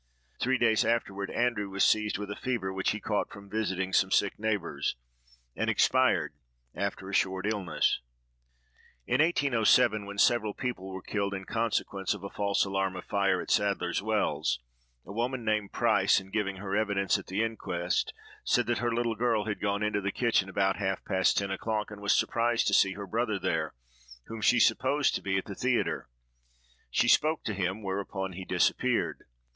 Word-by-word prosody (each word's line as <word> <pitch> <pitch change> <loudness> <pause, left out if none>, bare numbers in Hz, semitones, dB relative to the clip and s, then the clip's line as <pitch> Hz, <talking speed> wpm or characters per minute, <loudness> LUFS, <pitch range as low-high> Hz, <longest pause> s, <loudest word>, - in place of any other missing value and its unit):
Three 130 +1 +2
days 110 -3 +3
afterward, 100 -4 -1
Andrew 120 -4 0
was 95 0 0
seized 105 -1 +3
with 100 0 -5
a - - -4
fever 115 -7 -2
which 95 0 0
he 105 - 0
had - - -14
caught 105 -2 -1
from 100 -1 -12
visiting 95 -3 -1
some 95 - +3
sick 100 +1 +1
neighbors, 105 -5 -1 0.6
and - - -1
expired - - +3 0.4
after 100 -1 -3
a 100 - -7
short 95 0 +1
illness. 100 -7 0 1.0
In 125 +4 +2
1807, 115 -9 +3
when 100 0 -7
several 110 -1 +3
people 110 -7 -4
were 95 -1 -7
killed 100 -1 -2
in 95 0 -6
consequence 105 -3 -1
of 100 - -11
a 100 - -6
false 100 -1 +1
alarm 95 -1 -1
of 90 - -7
fire, 100 -2 +1
at - - -5
Sadler's 100 -3 +1
Wells, 110 - 0 0.5
a 100 - -9
woman 120 +2 -2
named 105 -2 0
Price, 110 -5 +3
in 95 0 -14
giving 100 -2 -1
her 95 0 -4
evidence 100 -2 +1
at - - -12
the 100 +4 0
inquest, 90 -6 -2 0.3
said 125 - +2
that 120 -1 0
her 120 +1 0
little 115 0 0
girl 110 -1 0
had 105 -2 -3
gone 100 0 0
into 105 -1 0
the 100 0 -1
kitchen 115 -5 +1
about 95 0 +1
half 95 -1 -2
past 95 0 +2
ten 100 -1 0
o'clock, 105 +2 -2
and 105 -1 -9
was 100 - +3
surprised 120 0 +1
to - - +1
see 95 -1 +4
her 100 +1 -7
brother 110 +2 -1
there, - - -2 0.5
whom 115 -1 -7
she 120 - +4
supposed 130 +6 +3
to - - -2
be 95 -1 0
at 95 - -2
the 100 - -6
theatre. 125 - -1 0.8
She - - +2
spoke 155 +1 +3
to 110 - -2
him, 95 +2 -2
whereupon 95 -1 -3
he 95 +2 -7
disappeared. - - 0
100 Hz, 185 wpm, -29 LUFS, 95-115 Hz, 1.0 s, see